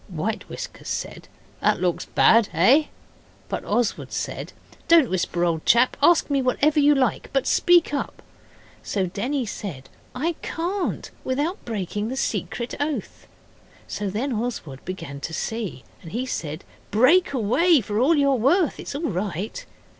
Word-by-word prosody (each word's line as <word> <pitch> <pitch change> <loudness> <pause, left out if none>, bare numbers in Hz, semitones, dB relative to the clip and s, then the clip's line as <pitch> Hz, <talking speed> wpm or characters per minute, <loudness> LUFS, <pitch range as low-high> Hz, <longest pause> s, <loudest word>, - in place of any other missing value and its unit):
White 200 +4 -4
Whiskers - - -8
said, - - -5 0.3
'That - - +2
looks 180 -2 0
bad 230 -2 +4
eh?' 255 - +5 0.6
But - - -3
Oswald 240 -3 -1
said, - - -4 0.4
'Don't 330 - +5
whisper, 175 -1 0
old 165 -2 0
chap. 240 +2 +4
Ask 330 +3 +5
me 280 -2 +1
whatever 290 +4 +2
you 295 0 +5
like, 265 -2 0
but - - +1
speak 350 -5 +4
up.' 285 - -4 0.6
So 195 -3 -1
Denny 245 +9 -2
said, 150 -11 -7 0.3
'I 310 +7 0
can't 355 +3 -3
without 295 +10 -2
breaking 210 -1 -3
the 260 - -4
secret 240 -2 -2
oath.' 290 +1 -4 0.6
So 205 -1 -3
then 240 +8 -2
Oswald 215 - -4
began 165 -7 -6
to 160 - -6
see, 220 - -4 0.2
and 165 - -10
he 245 +4 -2
said, 155 - -4 0.3
'Break 265 - +4
away 280 - +4
for 210 -1 -2
all 290 +7 +4
you're 280 -2 +3
worth, 280 - +2
it's - - -6
all 295 - -4
right. 190 +2 -3
240 Hz, 150 wpm, -24 LUFS, 195-290 Hz, 0.6 s, eh